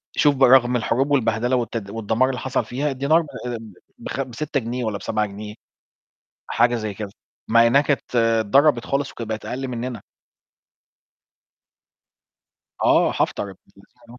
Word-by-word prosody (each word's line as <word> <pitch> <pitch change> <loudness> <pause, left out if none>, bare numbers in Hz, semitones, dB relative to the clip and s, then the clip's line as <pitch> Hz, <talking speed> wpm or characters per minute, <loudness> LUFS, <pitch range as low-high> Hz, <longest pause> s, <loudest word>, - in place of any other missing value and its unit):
شوف 145 -1 +4
برغم 125 -1 +5
الحروب 125 +4 0
والبهدلة 120 -2 +1
والتد 115 -4 -3
والدَمار 115 +4 0
اللي 125 - -3
حصل 130 -3 -1
فيها 140 +6 -2
الدينار 140 +5 +2
ب - - -8 0.2
آمم 115 -4 -6 0.2
بخم 135 +4 -4
ب6 140 +3 -2
جنيه 120 +2 -4
والّا 110 -3 -2
ب7 105 +1 -1
جنيه، 105 +1 -8 0.9
حاجة 120 +1 +2
زي 110 -3 -3
كده 105 0 -6 0.4
مع 115 +1 +5
إنّها 140 +4 +5
كانت 140 -3 -2
اتضربت 115 +4 +3
خالص 140 0 -1
وكانت 115 -2 -7
بقت 110 0 -4
أقل 135 +1 -4
منّنا. 125 0 -5 2.8
آه، - - +4
حَفتَر - - -1
ابن 95 - -13 0.2
اللذينه 115 +4 -18
120 Hz, 145 wpm, -22 LUFS, 110-135 Hz, 2.8 s, برغم